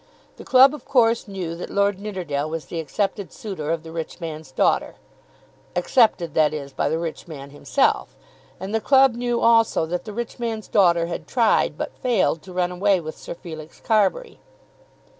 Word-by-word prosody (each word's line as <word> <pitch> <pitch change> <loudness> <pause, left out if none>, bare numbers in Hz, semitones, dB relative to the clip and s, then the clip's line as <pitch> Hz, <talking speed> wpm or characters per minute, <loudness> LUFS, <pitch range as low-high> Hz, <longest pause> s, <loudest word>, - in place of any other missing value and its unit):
The - - -10
club 265 +2 +6
of 300 - -8
course 230 -3 +2
knew 185 -4 -5
that 175 - -7
Lord 200 -1 +1
Nidderdale 175 -8 -3
was 160 0 -5
the 170 - -5
accepted 195 +5 -2
suitor 185 -8 -6
of 165 -1 -1
the 160 - -10
rich 165 +1 -6
man's 160 -4 -7
daughter, - - +1 0.8
accepted, 180 - +2
that 155 -1 +3
is, 140 -2 -7
by - - 0
the 160 - 0
rich 165 +1 -5
man 140 -4 -9
himself, 260 - 0 0.4
and 195 +3 -6
the 225 - +1
club 270 -1 +5
knew 240 0 -1
also 230 -7 +4
that 175 +2 -4
the 215 - -6
rich 235 +3 -5
man's 225 -2 -3
daughter 170 -5 +3
had 170 - -6
tried, 230 -4 +2
but - - -4
had - - -31
failed, 235 -10 +1
to 190 - -12
run 180 0 0
away 190 +1 +2
with 155 -1 -7
Sir - - -8
Felix 160 -2 -10
Carbury. 225 - 0
185 Hz, 185 wpm, -23 LUFS, 160-225 Hz, 0.8 s, club